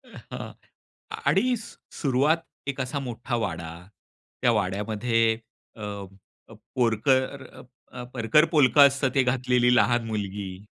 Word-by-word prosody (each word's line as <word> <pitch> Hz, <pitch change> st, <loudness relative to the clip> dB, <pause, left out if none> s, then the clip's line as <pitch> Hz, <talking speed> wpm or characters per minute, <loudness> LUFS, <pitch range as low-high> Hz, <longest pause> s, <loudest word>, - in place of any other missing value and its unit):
हां -, -, -8 dB, 0.7 s
आणि 255 Hz, 0 st, +3 dB
सु 220 Hz, -, -12 dB, 0.2 s
सुरुवात 140 Hz, +3 st, +2 dB, 0.3 s
एक 140 Hz, -1 st, -2 dB
असा 130 Hz, +3 st, -3 dB
मोठा 120 Hz, -2 st, -4 dB
वाडा 85 Hz, -7 st, -3 dB, 0.7 s
त्या -, -, +4 dB
वाड्यामध्ये 110 Hz, +4 st, 0 dB, 0.4 s
अ, 110 Hz, -, -8 dB, 0.9 s
पोरकर 130 Hz, +3 st, +1 dB, 0.5 s
अ, 125 Hz, -, -7 dB
परकर 120 Hz, +6 st, +3 dB
पोलक 145 Hz, -6 st, +3 dB
असतं 140 Hz, -1 st, +6 dB
ते 135 Hz, -, +4 dB
घातलेली 125 Hz, -1 st, +2 dB
लहान 120 Hz, -2 st, +3 dB
मुलगी. 100 Hz, -2 st, -5 dB
125 Hz, 110 wpm, -25 LUFS, 110-135 Hz, 0.9 s, असतं